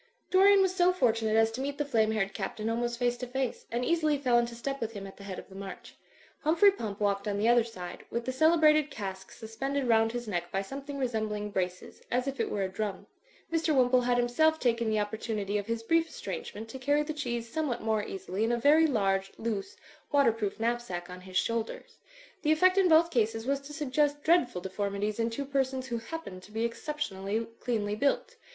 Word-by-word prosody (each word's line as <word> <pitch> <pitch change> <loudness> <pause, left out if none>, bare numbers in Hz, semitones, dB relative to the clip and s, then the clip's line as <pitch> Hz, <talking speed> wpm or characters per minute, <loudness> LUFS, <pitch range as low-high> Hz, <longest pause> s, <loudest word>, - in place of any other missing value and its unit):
Dorian 390 +1 +6
was 375 -1 +1
so 360 -1 +4
fortunate 225 -9 +1
as 225 0 +4
to 245 +4 -4
meet 285 +1 -3
the 295 - -1
flame 225 -6 +2
haired 195 -3 0
Captain 215 +2 -3
almost 240 +1 -1
face 245 0 +1
to 250 - -5
face, 260 0 -3
and 240 +2 -1
easily 310 -3 +2
fell 250 -4 +3
into 235 0 -2
step 275 +3 -4
with 225 0 -3
him 200 -2 -6
at 195 - -10
the 200 - -11
head 195 -2 -6
of - - -9
the 190 - -15
march. 195 0 -8 0.5
Hum 310 +2 +1
phrey 400 +3 +6
Pump 210 - -5
walked 200 0 0
on 200 -1 -1
the 210 +2 +1
other 240 0 +5
side, 180 -6 -8
with 235 0 -3
the 260 - -1
cele 315 +6 +4
brated 305 -1 +5
cask 190 -7 -6
suspended 265 +5 -3
roimd 225 -1 +3
his 240 -1 -5
neck 175 -4 -3
by 195 0 -1
something 275 +6 -7
resembling 215 -5 -2
braces, 185 -1 -3
as 250 +2 0
if 275 0 -3
it - - 0
were 200 - -1
a - - 0
drum. 200 0 -4 0.5
Mr. 325 -2 +2
Wim 250 -2 +4
pole 255 -1 +5
had 245 0 +1
himself 315 +7 +3
taken 235 -2 +1
the 215 -1 +1
opportunity 210 -1 -2
of 205 - -6
his 230 0 -2
brief 330 +6 +2
estrangement 460 - -6
to 265 - -7
carry 290 +3 +2
the 310 +1 -4
cheese 240 -6 -3
somewhat 270 -1 -2
more 220 -1 +1
easily 195 +1 -4
in 225 - +1
a 240 - +2
very 300 +6 +5
large, 195 -6 +1
loose, 230 - -3 0.3
waterproof 230 -9 +2
knapsack 225 -7 -2
on 180 0 -9
his 185 0 -4
shoulders. 230 -1 -2 0.4
The 305 - +2
effect 370 +5 +5
in 375 -2 +4
both 330 +1 +5
cases 225 -3 0
was 275 +1 +1
to 280 +1 -12
suggest 290 0 0
dreadful 310 - +3
deformities 200 +3 -2
in 230 0 +1
two 275 +5 -4
persons 265 -1 -1
who 240 -3 -3
happened 230 - -7
to 200 - -15
be 225 +2 -1
exceptionally 230 -5 -3
cleanly 215 -4 -1
built. 280 - 0
235 Hz, 220 wpm, -29 LUFS, 210-285 Hz, 0.5 s, Dorian